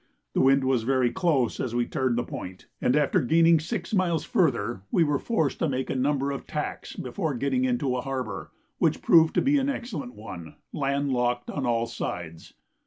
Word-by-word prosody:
The - - +2
wind 135 +1 +4
was 130 -2 +2
very 125 0 +2
close 155 -10 +1
as 120 -2 -2
we 120 0 +2
turned 130 -2 -1
the 120 - +1
point; 95 -5 -8 0.2
and 125 - +2
after 150 -2 +3
gaining 165 +4 +4
six 170 +4 -4
miles 175 -5 +1
further, 135 - +1
we 170 - +3
were 145 -3 +1
forced 160 - -1
to 165 - +1
make 130 -1 -2
a - - -2
number 140 +1 +1
of 140 - -6
tacks 150 -1 -4
before 150 +3 -3
getting 130 0 0
into 125 +1 0
a 125 - -1
harbour, 135 -1 -4 0.3
which - - +1
proved 160 -1 +5
to - - +3
be 285 +1 +3
an 270 +1 0
excellent 195 - -5
one, 90 -7 -9 0.2
land 140 0 0
locked 125 0 0
on 140 -4 -2
all 115 -1 +1
sides. 85 -8 -6
135 Hz, 195 wpm, -26 LUFS, 120-160 Hz, 0.3 s, proved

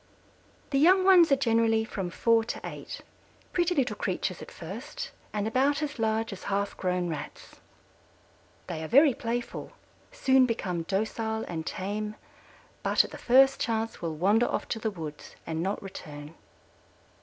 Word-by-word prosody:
The 275 - +2
young 370 +5 +6
ones 360 -5 +7
are - - +7
generally 225 -3 +2
from 195 -5 -4
four 230 +5 +3
to - - -4
eight, - - -7 0.5
pretty 355 0 +2
little 245 -6 +1
creatures 185 -2 -2
at - - -9
first 220 - -7 0.2
and 210 0 -1
about 275 +6 +2
as 295 -3 -4
large 220 -1 0
as 185 - -10
half 200 0 -1
grown 180 -1 -1
Rats. 150 -3 -7 1.1
They 165 -3 -5
are - - -4
very 280 - +6
playful, 235 +1 -4 0.4
soon 265 - +4
become 185 -7 -2
docile 220 +4 -2
and 160 -2 -5
tame, 210 +3 -3 0.7
but - - +4
at - - -9
the - - -9
first 270 +2 +5
chance 225 0 -2
will 165 -2 -3
wander 205 +9 +3
off - - -2
to 225 - -2
the 220 - -1
woods 160 -7 -8
and 160 0 -3
not 195 +4 -1
return. 150 -5 -9
220 Hz, 155 wpm, -28 LUFS, 185-255 Hz, 1.1 s, ones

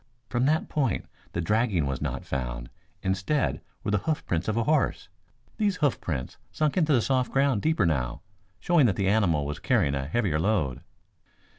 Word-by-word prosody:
From 125 +1 +1
that 155 +2 +2
point 135 -6 0 0.3
the 85 - -1
dragging 105 - +1
was 65 -2 -3
not - - -3
found. - - -4 0.3
Instead, 95 +10 0 0.2
were - - -1
the 105 - +2
hoofprints 95 - -2
of 110 +1 0
a 115 - +2
horse. 150 -7 +1 0.5
These 205 -3 +1
hoofprints 90 - -2
sunk 155 -2 0
into 160 -4 +2
the 120 -6 +4
soft 130 -2 +1
ground 135 -5 +2
deeper 155 - +2
now, 65 -7 -1 0.4
showing 165 - +4
that 100 - +1
the 100 - 0
animal 90 -8 +2
was 75 +1 -4
carrying 100 - +2
a 70 -1 -2
heavier 85 -3 0
load." 80 - 0
105 Hz, 170 wpm, -27 LUFS, -, 0.5 s, the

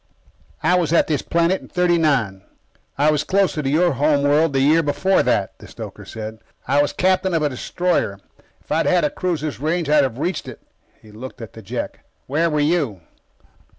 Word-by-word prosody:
"I - - +3
was 165 -4 -1
at 170 - +4
this 150 -3 -1
planet 170 +3 +1
in - - -13
'39. 155 - +1 0.6
I 150 +2 +4
was 150 -1 0
closer 190 -3 +1
to 135 - -2
your 170 +5 +3
home 145 +1 +2
world 150 +2 +3
the 135 - +2
year 150 +5 +4
before 145 +6 +2
that," - - 0
the - - -12
stoker - - -9
said. 110 0 -7 0.3
"I 145 - +3
was 145 - 0
captain 185 -1 +1
of 160 - +1
a 150 - +2
destroyer. 135 - -1 0.4
If - - -18
I'd - - +1
had 180 -2 +3
a 150 - +1
cruiser's 160 -6 -3
range, 160 +2 -1
I 150 - +5
would 145 - +5
have 125 -3 -5
reached 175 +4 -2
it." - - -9 0.4
He 110 - -17
looked 125 +5 -9
at 115 -4 -9
the 110 - -11
Jek. 95 - -5 0.3
"Where 160 +5 +1
were 150 -1 0
you?" 145 - 0
150 Hz, 200 wpm, -21 LUFS, 135-170 Hz, 0.6 s, I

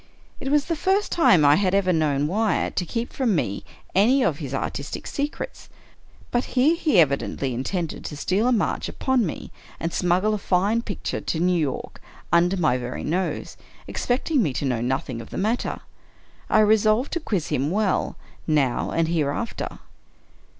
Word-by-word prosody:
It 270 - -3
was 290 0 +3
the 335 - -1
first 385 +6 +1
time 185 - +5
I 145 +1 +6
had 195 -1 +2
ever 185 -2 +2
known 150 -3 +1
Wyatt 210 +7 0
to 180 - 0
keep 235 +5 -3
from 240 -7 +1
me 100 -10 -2 0.3
any 245 +8 +4
of 150 -9 0
his 140 -5 -5
artistical 140 +1 -4
secrets; 290 +2 -4 0.6
but 245 +1 +1
here 290 +7 +5
he 305 - +2
evidently 140 -3 +1
intended 160 +7 -3
to 150 - -5
steal 195 +9 +1
a - - +3
march 230 - 0
upon 260 -2 +1
me, - - -6 0.3
and 165 +1 -3
smuggle 185 +4 +2
a 210 - -1
fine 200 +5 +1
picture 205 -4 -4
to 160 - -2
New 180 +2 +2
York, 145 -5 -3 0.3
under 175 +3 +4
my 150 -8 +2
very 125 0 -5
nose; 180 +5 -2 0.3
expecting 265 +3 0
me 150 - 0
to 140 - -2
know 125 -4 0
nothing 130 -1 -2
of 115 - -11
the - - -6
matter. 220 +5 -1 0.7
I 215 - +5
re 215 +1 +5
solved 215 +5 +1
to 340 - 0
quiz 200 - -2
him 135 +3 0
well, 200 +1 0 0.3
now 145 -6 +1
and 165 -1 +1
hereafter. 165 +6 -2
185 Hz, 175 wpm, -24 LUFS, 150-230 Hz, 0.7 s, I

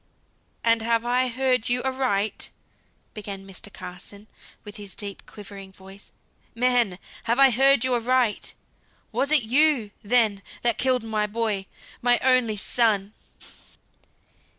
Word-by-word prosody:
"And 230 -1 +3
have 230 +1 +1
I 250 +1 +2
heard 250 -1 +1
you 245 +1 0
aright?" 255 -6 0 0.6
began 200 -3 -7
Mr. 195 +1 -8
Carson, 200 +4 -10 0.4
with 210 -1 -10
his 205 -2 -9
deep 200 -2 -6
quivering 200 -2 -11
voice. 195 +1 -14 0.4
"Man! 240 -6 +2 0.3
have 235 +1 +1
I 275 -1 +7
heard 270 +1 +4
you 255 - +1
aright? 245 -2 +1 0.6
Was 280 - 0
it 305 -5 +5
you, 255 -2 +3
then, 215 -2 +2 0.2
that 235 -1 +1
killed 255 -2 +2
my 215 -2 -1
boy? 210 -3 -2 0.3
my 245 0 +4
only 255 -4 +3
son?" 210 -2 +1
230 Hz, 125 wpm, -24 LUFS, 205-250 Hz, 0.6 s, I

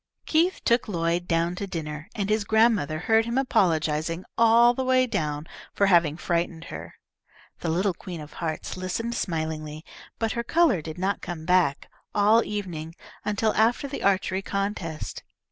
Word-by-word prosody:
Keith 335 +4 +2
took 235 +1 +3
Lloyd 170 -2 -1
down 170 +1 +1
to 200 +2 -5
dinner, 155 -4 -5
and 200 -2 -1
his 215 0 +2
grandmother 220 -8 +3
heard 225 +4 +3
him 235 +2 -2
apologising 165 - +1
all 230 +1 +6
the 260 - -2
way 255 0 +3
down 150 -9 -2 0.3
for 200 - +3
having 170 -5 +4
frightened 170 -1 -1
her. - - -8 0.6
The 170 - -3
little 185 +4 +1
Queen 175 -1 -8
of 150 0 -10
Hearts 160 -2 -3
listened 185 +6 -3
smilingly, 160 -5 -3 0.3
but 225 -1 -1
her 235 0 -2
colour 310 - +3
did 160 +1 -7
not 190 +2 -1
come 165 -3 -6
back 175 -6 +2 0.3
all 215 +3 +5
evening, 170 -6 -5 0.3
until 210 +1 +1
after 230 +6 +2
the 280 - -6
archery 190 -1 +1
contest. 195 -6 -3
185 Hz, 160 wpm, -26 LUFS, 165-225 Hz, 0.6 s, all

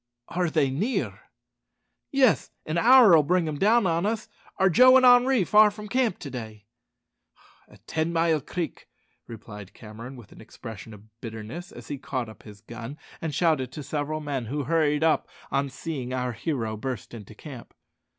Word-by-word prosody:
"Are 175 0 0
they 150 -4 +1
near?" 205 - -3 0.8
"Yes; 265 -5 +3 0.2
an 160 +2 -1
hour'll 230 -7 +7
bring 175 +3 +1
them 150 -2 -4
down 220 +2 +4
on 170 -1 +1
us. 220 +1 -2 0.3
Are 190 - +4
Joe 255 +8 +7
and 255 - +4
Henri 245 -2 +6
far 210 +3 +6
from 210 +1 -9
camp 245 -3 0
to 140 - -7
day?" 110 -4 -8 1.0
"At - - -20
Ten 160 +1 -1
mile 165 -2 +2
Creek," 170 0 -5 0.4
replied 105 -3 -10
Cameron 115 +4 -10
with 120 -5 -14
an - - -14
expression 110 -1 -10
of 110 +2 -21
bitterness, 115 - -7
as - - -12
he 145 -2 -4
caught 130 -5 -4
up 110 - -14
his 105 -2 -14
gun 115 +5 -8 0.2
and 160 -4 -3
shouted 150 -7 +1
to 150 - -6
several 155 +2 -3
men, 140 -5 -3
who 145 +4 -2
hurried 150 0 +1
up 160 -1 +2 0.2
on 140 0 0
seeing 130 -2 -5
our 125 -1 -2
hero 115 -3 -3
burst 125 0 -6
into 110 -2 -10
camp. 130 -1 -11
150 Hz, 170 wpm, -26 LUFS, 120-175 Hz, 1.0 s, hour'll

